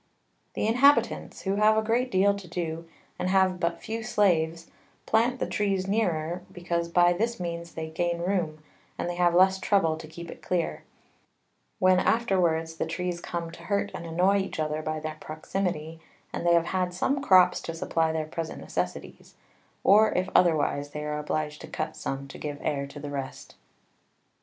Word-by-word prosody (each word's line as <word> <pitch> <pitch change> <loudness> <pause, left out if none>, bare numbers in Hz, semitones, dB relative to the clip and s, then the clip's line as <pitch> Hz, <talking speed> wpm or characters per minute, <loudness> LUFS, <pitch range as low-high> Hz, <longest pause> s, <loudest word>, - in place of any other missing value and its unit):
The - - 0
Inhabitants, 260 +6 +3
who 195 +1 0
have 215 +1 +5
a 220 - +2
great 240 +3 +1
deal 200 -1 +3
to 200 -2 -8
do, 165 -1 -4 0.3
and 180 - -1
have 190 -1 +3
but 170 -1 -1
few 225 +1 -4
Slaves, 170 -7 +1 0.4
plant 235 +3 +2
the - - 0
Trees 195 -2 0
nearer, 175 -5 0
because 170 -1 -2
by 175 +1 +4
this 230 +5 -1
means 170 -1 -5
they 160 -1 -4
gain 170 +2 -1
room, 170 -4 -2 0.3
and - - -2
they 175 - -2
have 175 -1 +2
less 190 +1 +5
trouble 185 -5 +2
to 155 - -9
keep 170 +2 -9
it - - -12
clear; 175 -2 -2 0.9
when 185 0 +4
afterwards 170 -8 +1
the - - -1
Trees 175 +1 -3
come 170 -1 -4
to - - -12
hurt 200 -1 0
and 170 - -6
annoy 180 +5 +3
each 190 -4 -4
other 155 0 -1
by 155 0 -3
their 155 0 -5
Proximity, 160 0 -4 0.3
and 175 - -2
they 170 - +6
have 170 -1 +3
had 180 -1 0
some 270 +9 0
Crops 185 -8 +5
to 165 - -5
supply 165 0 0
their 160 -1 -2
present 160 +1 -5
Necessities: 90 0 -5 0.5
or 215 +2 +6
if 185 +1 0
otherwise, 150 -4 +3
they 150 +1 -6
are 150 0 -2
obliged 150 0 -3
to 160 - -8
cut - - -4
some 135 0 -4
to - - -10
give 145 -1 -4
Air 140 -1 -1
to 140 +1 -10
the 145 0 -6
rest. 135 -2 -6
175 Hz, 180 wpm, -27 LUFS, 160-190 Hz, 0.9 s, they